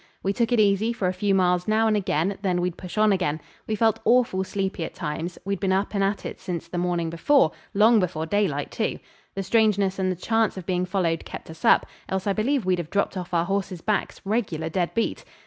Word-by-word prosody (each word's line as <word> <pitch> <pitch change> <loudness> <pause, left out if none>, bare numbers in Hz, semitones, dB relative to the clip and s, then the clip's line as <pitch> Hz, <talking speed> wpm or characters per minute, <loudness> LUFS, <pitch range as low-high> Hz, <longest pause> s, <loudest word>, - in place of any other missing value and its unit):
We 195 - +1
took 230 +2 0
it 240 - +3
easy 210 +2 +3
for 210 -6 -1
a 180 - 0
few 195 +1 +1
miles 180 -1 +2
now 220 +1 +3
and 215 - +2
again, 190 -1 0
then 185 -3 0
we'd 175 -1 -1
push 180 +2 -9
on 215 0 +5
again. 180 -6 0 0.3
We 220 - 0
felt 220 0 +2
awful 235 -6 +3
sleepy 190 -2 -3
at - - -6
times; 160 +4 -4
we'd 200 -1 -2
been 195 -2 0
up 195 +2 0
and 200 -1 +1
at 200 +1 -1
it - - -6
since 170 -3 -4
the 175 +1 -3
morning 175 -2 -1
before; 170 - +3 0.2
long 220 +3 +6
before 165 -4 -1
daylight, 175 -6 0
too. - - -1 0.4
The 195 - -2
strangeness 205 -2 +2
and 185 -1 +1
the - - -2
chance 225 +3 0
of 185 - -6
being 180 -1 0
followed 175 -4 0
kept - - -9
us 160 +1 -13
up, - - +5 0.2
else 190 0 -2
I 200 - +2
believe 240 +3 0
we'd 185 -1 +1
have 165 -2 -5
dropped 200 +1 0
off 180 -1 -5
our 170 -1 +1
horses' 195 -2 -2
backs, 210 +2 -1
regular 185 -7 -1
dead 175 +1 -1
beat. 230 - -1
190 Hz, 235 wpm, -25 LUFS, 175-210 Hz, 0.4 s, long